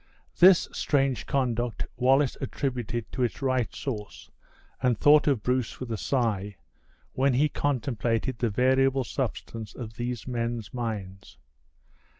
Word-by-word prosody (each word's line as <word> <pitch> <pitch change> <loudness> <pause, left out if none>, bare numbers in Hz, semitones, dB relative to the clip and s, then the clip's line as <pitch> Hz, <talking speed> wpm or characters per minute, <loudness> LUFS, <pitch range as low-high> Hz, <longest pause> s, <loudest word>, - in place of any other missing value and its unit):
This 185 0 +7
strange 135 -6 0
conduct 120 -4 -1
Wallace 135 +2 +3
attributed 125 -4 -3
to 130 - -4
its 120 - 0
right 130 -4 0
source, 105 -7 -6 0.5
and 125 -3 +2
thought 150 +5 +5
of 130 -8 +2
Bruce 125 -1 -1
with 130 -2 -6
a - - 0
sigh, 105 -6 -1 0.6
when 135 -1 +2
he 145 +4 +4
contemplated 125 -4 -1
the 120 - +1
variable 130 +4 +2
substance 115 -4 -5
of 115 -2 -8
these 120 -3 -4
men's 115 -4 -3
minds. 105 - -5
125 Hz, 130 wpm, -27 LUFS, 115-135 Hz, 0.6 s, This